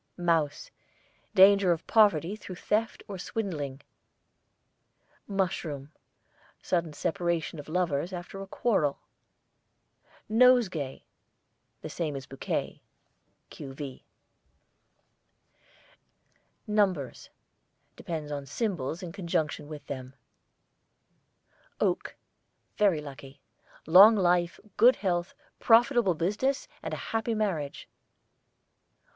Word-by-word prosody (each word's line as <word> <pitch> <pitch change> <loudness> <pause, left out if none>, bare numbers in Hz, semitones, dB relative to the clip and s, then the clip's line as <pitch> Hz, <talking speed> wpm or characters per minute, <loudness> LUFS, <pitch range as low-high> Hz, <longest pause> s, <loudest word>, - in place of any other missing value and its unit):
MOUSE, 165 -5 0 0.6
danger 195 -1 +7
of 165 -1 -1
poverty 205 -4 +3
through 190 -3 -9
theft 215 +5 -1
or 195 -2 -7
swindling. 150 -11 -4 1.5
MUSHROOM, 165 -8 -2 0.7
sudden 170 -3 -1
separation 170 0 -2
of 145 - -9
lovers 170 -1 0
after 180 +2 -7
a 195 - -7
quarrel. 190 -10 0 1.3
NOSEGAY, 220 - +3 0.8
the - - -5
same 155 -4 -3
as 135 0 -6
BOUQUET 135 - -4 0.7
(q.v.). 135 -1 -8 2.6
NUMBERS 195 - 0 0.7
depends 155 -3 -5
on 140 -1 -5
symbols 175 - -3
in 175 - -6
conjunction 165 -5 -2
with 150 -2 -9
them. 130 -1 -7 1.6
OAK, - - -1 0.6
very 195 -7 +3
lucky; 140 -1 -11 0.5
long 195 +7 +9
life, 175 -3 +2 0.2
good 245 +4 +7
health, 175 -2 -2 0.2
profitable 235 -4 +4
business, 210 - -1
and - - -5
a - - -3 0.2
happy 225 0 0
marriage. 170 -10 -2
175 Hz, 90 wpm, -28 LUFS, 150-205 Hz, 2.6 s, long